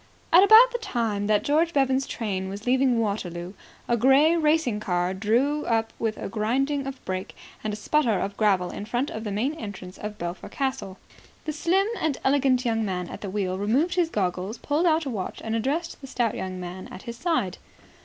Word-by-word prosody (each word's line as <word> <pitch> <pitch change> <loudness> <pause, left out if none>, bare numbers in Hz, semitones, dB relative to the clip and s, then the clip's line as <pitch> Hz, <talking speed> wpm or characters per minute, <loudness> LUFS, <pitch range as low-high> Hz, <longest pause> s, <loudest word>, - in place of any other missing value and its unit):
At 355 +3 +9
about 445 +4 +8
the 480 - -3
time 230 - -1
that 210 -1 +2
George 325 +4 +2
Bevan's 270 -1 +2
train 190 -7 -3
was 200 +2 -7
leaving 255 -1 +3
Waterloo, 185 -4 -3 0.3
a 240 - +2
grey 270 +7 +5
racing 305 -8 +2
car 180 -3 0
drew 240 +10 +1
up 225 -1 0
with 220 -1 -1
a - - -5
grinding 270 +7 0
of 270 -1 -8
brakes 185 0 -4 0.3
and 215 - -1
a - - -3
sputter 225 -1 +1
of 200 0 -3
gravel 195 -5 +2
in 205 - -6
front 245 +5 -1
of 220 - -5
the 210 - -4
main 235 +9 0
entrance 200 - -8
of 210 0 -6
Belpher 175 -1 -5
Castle. 265 -8 -3 0.5
The 305 - -2
slim 355 +6 +2
and 310 -4 0
elegant 265 -2 +2
young 225 -1 +1
man 180 -4 -3
at - - -8
the 200 - -4
wheel 190 -1 -2
removed 260 - +1
his 345 -2 +1
goggles, 190 - -2
pulled 300 +8 0
out 320 -1 +2
a - - -2
watch, 195 -5 -4
and 225 0 -2
addressed 285 +10 -2
the 270 - -8
stout 240 -3 0
young 185 -1 -5
man 180 +1 -7
at - - -10
his 235 0 -7
side. 245 - -1
230 Hz, 205 wpm, -25 LUFS, 200-285 Hz, 0.5 s, At